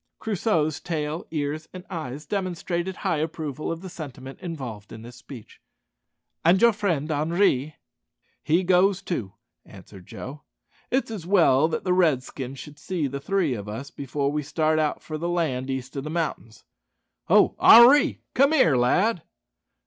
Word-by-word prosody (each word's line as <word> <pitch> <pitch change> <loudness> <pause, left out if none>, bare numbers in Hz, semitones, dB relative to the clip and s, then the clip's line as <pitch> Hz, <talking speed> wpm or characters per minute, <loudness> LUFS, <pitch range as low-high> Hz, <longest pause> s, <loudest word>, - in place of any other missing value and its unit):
Crusoe's 170 -8 0
tail, 155 -1 -4
ears, 155 0 -3
and 185 0 -9
eyes 155 -5 -6
demonstrated 185 0 -3
high 165 - -1
approval 155 -2 -4
of 165 0 -5
the 190 - -8
sentiment 135 -6 -9
involved 130 - -7
in 110 - -10
this 120 +1 -11
speech. 120 -2 -13 0.8
"And 175 +3 +5
your 235 +1 +5
friend 170 -8 -1
Henri?" 155 -2 +1 0.7
"He 170 +4 +1
goes 190 +2 +3
too," 115 - -4 0.3
answered 95 -2 -14
Joe. 145 +3 -8 0.5
"It's 260 -2 0
as 190 -7 -7
well 160 -7 +4
that 160 - -3
the 180 - +1
Redskins 135 -6 0
should 150 +2 -11
see 170 -1 -2
the 140 0 -4
three 175 -4 0
o' 100 - -6
us 115 +7 -7
before 140 +1 -2
we 150 +1 -1
start 155 +1 0
for 155 -1 -6
the 170 +2 -2 0.4
east 130 -1 -4
side 140 - -4
o' - - -4
the 150 - -6
mountains. 155 -9 -4 0.6
Ho, - - +4
Henri! 250 +5 +7
come 275 +4 +4
here, 215 - +4
lad." 175 - +2
155 Hz, 155 wpm, -25 LUFS, 135-180 Hz, 0.8 s, Henri